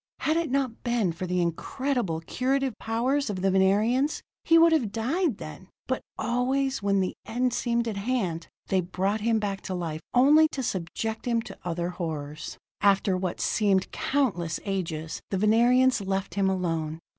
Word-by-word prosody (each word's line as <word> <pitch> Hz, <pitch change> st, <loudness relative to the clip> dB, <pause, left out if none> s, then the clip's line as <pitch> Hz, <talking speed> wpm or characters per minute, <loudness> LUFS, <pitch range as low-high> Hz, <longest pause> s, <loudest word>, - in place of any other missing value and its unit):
Had 310 Hz, -, +1 dB
it 335 Hz, -2 st, 0 dB
not 260 Hz, -3 st, -1 dB
been 235 Hz, -7 st, +1 dB
for 175 Hz, +3 st, -5 dB
the 180 Hz, 0 st, 0 dB
incredible 190 Hz, -, -2 dB
curative 260 Hz, +7 st, 0 dB
powers 250 Hz, +5 st, 0 dB
of 190 Hz, -3 st, -3 dB
the 195 Hz, -, +3 dB
Venerians, 215 Hz, +9 st, +2 dB, 0.2 s
he 330 Hz, -, +5 dB
would 330 Hz, 0 st, +7 dB
have 260 Hz, -11 st, +2 dB
died 260 Hz, -, 0 dB
then; 155 Hz, +4 st, -9 dB, 0.2 s
but 260 Hz, -, -2 dB, 0.2 s
always, 265 Hz, +2 st, 0 dB
when 200 Hz, -1 st, +2 dB
the 185 Hz, -, -1 dB
end 250 Hz, +1 st, 0 dB
seemed 235 Hz, -1 st, 0 dB
at 215 Hz, -3 st, -3 dB
hand, 200 Hz, -7 st, -2 dB, 0.2 s
they 190 Hz, -1 st, +3 dB
brought 190 Hz, +4 st, -1 dB
him 225 Hz, +1 st, +2 dB
back 200 Hz, -2 st, -2 dB
to 185 Hz, -, -4 dB
life, 165 Hz, -3 st, -4 dB
only 295 Hz, +5 st, +6 dB
to 265 Hz, -, -3 dB
subject 220 Hz, +3 st, -3 dB
him 235 Hz, -1 st, +2 dB
to -, -, -10 dB
other 175 Hz, 0 st, -2 dB
horrors. 155 Hz, -4 st, -5 dB, 0.2 s
After 195 Hz, -1 st, +3 dB
what 185 Hz, -1 st, -3 dB
seemed 200 Hz, -3 st, +1 dB
countless 200 Hz, -, 0 dB
ages, 165 Hz, -5 st, -3 dB
the 195 Hz, -, -1 dB
Venerians 240 Hz, +4 st, +4 dB
left 195 Hz, -2 st, -2 dB
him 195 Hz, 0 st, +2 dB
alone. 165 Hz, -4 st, -1 dB
205 Hz, 170 wpm, -27 LUFS, 180-255 Hz, 0.2 s, would